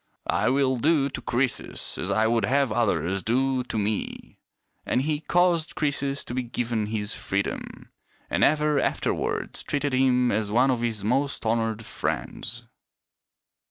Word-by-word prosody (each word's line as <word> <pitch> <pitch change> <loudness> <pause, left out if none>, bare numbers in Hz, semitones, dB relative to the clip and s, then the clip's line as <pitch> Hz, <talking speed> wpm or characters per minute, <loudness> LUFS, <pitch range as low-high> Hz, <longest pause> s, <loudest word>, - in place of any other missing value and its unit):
I - - +2
will 130 -1 +2
do 145 +1 +2
to - - -5
Croesus 125 0 -1
as 90 - -2
I 110 +2 +2
would 115 -1 +2
have 135 +1 +2
others 95 -5 +1
do 130 +4 +1
to 115 - -3
me." 105 0 -3 0.4
And 130 - 0
he 150 0 0
caused 170 0 +2
Croesus 140 -2 -1
to - - -7
be 130 - 0
given 115 -2 -2
his 105 -1 -2
freedom; 100 +1 -3 0.4
and - - +1
ever 150 -1 +3
afterwards - - -1
treated 145 -1 -2
him 125 -1 +3
as 105 -1 0
one 125 +4 +4
of 120 -2 -1
his 115 -4 -1
most 135 +4 0
honored 115 -1 0
friends. - - -3
125 Hz, 150 wpm, -26 LUFS, 110-140 Hz, 0.4 s, one